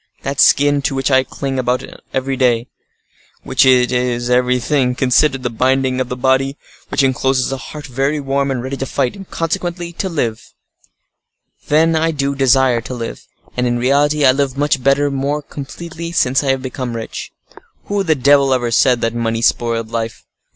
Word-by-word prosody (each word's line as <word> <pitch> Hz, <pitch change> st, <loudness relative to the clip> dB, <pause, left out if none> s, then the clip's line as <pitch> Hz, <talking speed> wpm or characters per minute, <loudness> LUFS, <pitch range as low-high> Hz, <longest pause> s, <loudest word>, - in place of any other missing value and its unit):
That 140 Hz, 0 st, -3 dB
skin 145 Hz, 0 st, +4 dB
to 135 Hz, -, -1 dB
which 135 Hz, +1 st, 0 dB
I 130 Hz, 0 st, +5 dB
cling 135 Hz, 0 st, -4 dB
above 125 Hz, 0 st, 0 dB, 0.3 s
everything, 130 Hz, -3 st, +1 dB, 0.8 s
because -, -, +3 dB
it 125 Hz, -2 st, +4 dB
is, 125 Hz, -1 st, -1 dB
everything 125 Hz, +1 st, +1 dB
considered, 130 Hz, +1 st, +2 dB
the 125 Hz, -, -2 dB
binding 130 Hz, +2 st, +1 dB
of 125 Hz, -, -4 dB
a -, -, -1 dB
body 130 Hz, +2 st, +1 dB, 0.3 s
which -, -, +1 dB
encloses 130 Hz, 0 st, +1 dB
a 135 Hz, -, -2 dB
heart 150 Hz, +3 st, -9 dB
very 135 Hz, +3 st, -1 dB
warm 140 Hz, 0 st, -1 dB
and 125 Hz, -3 st, -2 dB
ready 135 Hz, +1 st, -4 dB
to 135 Hz, -, -4 dB
fight, 130 Hz, -2 st, -1 dB
and, 195 Hz, -2 st, -11 dB
consequently, 170 Hz, +1 st, -3 dB
to 190 Hz, +3 st, -3 dB
live. 120 Hz, -10 st, -2 dB, 1.2 s
Then, 160 Hz, +2 st, +3 dB
I 160 Hz, +1 st, +2 dB
do 140 Hz, -3 st, -1 dB
desire 130 Hz, -3 st, +3 dB
to 125 Hz, +3 st, -7 dB
live: 115 Hz, -1 st, -7 dB, 0.3 s
and, 125 Hz, 0 st, 0 dB
in 120 Hz, 0 st, 0 dB
reality, 145 Hz, +4 st, +2 dB
I 130 Hz, -, +7 dB
live 135 Hz, 0 st, -1 dB
much 145 Hz, -2 st, +1 dB
better, 140 Hz, +2 st, +2 dB
more 140 Hz, +2 st, -2 dB
completely, 170 Hz, +4 st, -8 dB
since 130 Hz, -3 st, +2 dB
I 140 Hz, -, -1 dB
have 135 Hz, -1 st, 0 dB
become 125 Hz, -2 st, -4 dB
rich. 115 Hz, -1 st, -6 dB, 0.5 s
Who 205 Hz, 0 st, -1 dB
the 160 Hz, -5 st, +2 dB
devil 140 Hz, 0 st, +4 dB
ever 120 Hz, -2 st, -1 dB
said 120 Hz, +1 st, +3 dB
that 115 Hz, 0 st, 0 dB
money 115 Hz, -1 st, -2 dB
spoiled 115 Hz, -1 st, 0 dB
life? 115 Hz, -1 st, -4 dB
135 Hz, 180 wpm, -17 LUFS, 125-140 Hz, 1.2 s, I